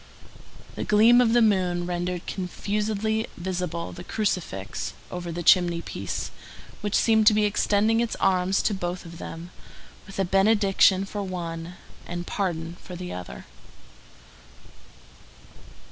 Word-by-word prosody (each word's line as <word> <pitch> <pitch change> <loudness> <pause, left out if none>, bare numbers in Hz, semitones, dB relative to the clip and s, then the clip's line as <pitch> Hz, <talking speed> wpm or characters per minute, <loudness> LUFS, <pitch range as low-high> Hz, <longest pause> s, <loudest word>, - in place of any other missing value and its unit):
The - - -4
gleam 225 +4 +6
of 230 -2 +3
the 240 -1 +5
moon 180 -4 +2
rendered 175 0 -3
confusedly 210 +3 -2
visible 175 -2 -3
the 175 - -9
crucifix 180 - -3 0.2
over 175 -1 -5
the 175 +1 -4
chimney 175 -1 +4
piece, - - -4 0.5
which 210 0 -1
seemed 220 -2 +4
to 210 - +7
be 210 0 +3
extending 210 +2 +2
its 235 -1 0
arms 185 +1 +2
to 215 - +1
both 180 -1 -4
of 170 0 -10
them, 170 +2 -8 0.6
with 195 - -10
a 195 - +1
benediction 195 0 +4
for 205 +1 -5
one 175 -2 -5 0.3
and 175 0 -4
pardon 170 -4 -3
for 180 - -9
the 180 0 -6
other. 65 -9 -8
185 Hz, 130 wpm, -25 LUFS, 175-210 Hz, 0.6 s, to